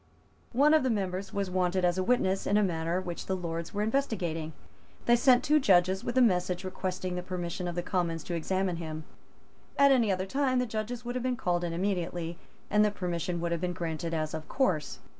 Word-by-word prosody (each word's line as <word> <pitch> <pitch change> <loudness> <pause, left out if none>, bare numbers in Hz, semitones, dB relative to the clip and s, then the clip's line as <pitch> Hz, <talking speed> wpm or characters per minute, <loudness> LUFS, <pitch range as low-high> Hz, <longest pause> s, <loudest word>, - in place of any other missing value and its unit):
One 285 +5 +5
of 315 - +6
the 260 - +1
members 195 -3 -2
was 200 -2 -2
wanted 180 0 +1
as 175 0 +2
a - - +1
witness 195 -4 +1
in 205 - +3
a 210 - +4
matter 170 -1 0
which 175 -2 -6
the 190 - 0
Lords 170 -2 -4
were 205 +1 -1
investigating. 185 - -1 0.5
They 240 - +6
sent 250 +1 +5
two 300 +3 +4
judges 190 -5 +3
with 240 - -2
a 255 - +7
message 180 -3 +1
requesting 185 -1 -3
the 180 - -2
permission 180 -1 -4
of 175 - -4
the 175 - -2
Commons 170 -4 -1
to 175 - -5
examine 185 +2 -1
him. 155 -1 -5 0.7
At 280 0 +6
any 235 -6 +4
other 185 0 -1
time 265 +4 +1
the 250 - +2
judges 225 +2 -4
would 245 - -3
have 250 - -2
been 255 -1 0
called 175 -3 0
in 170 - -2
immediately, 175 -2 -2 0.3
and 210 0 +4
the 210 - +4
permission 175 -3 -3
would 170 0 -1
have 170 -1 -1
been 180 -1 -1
granted 165 -1 -3
as 155 -2 -2
of 155 -1 -5
course. 170 - 0
185 Hz, 215 wpm, -29 LUFS, 170-215 Hz, 0.7 s, a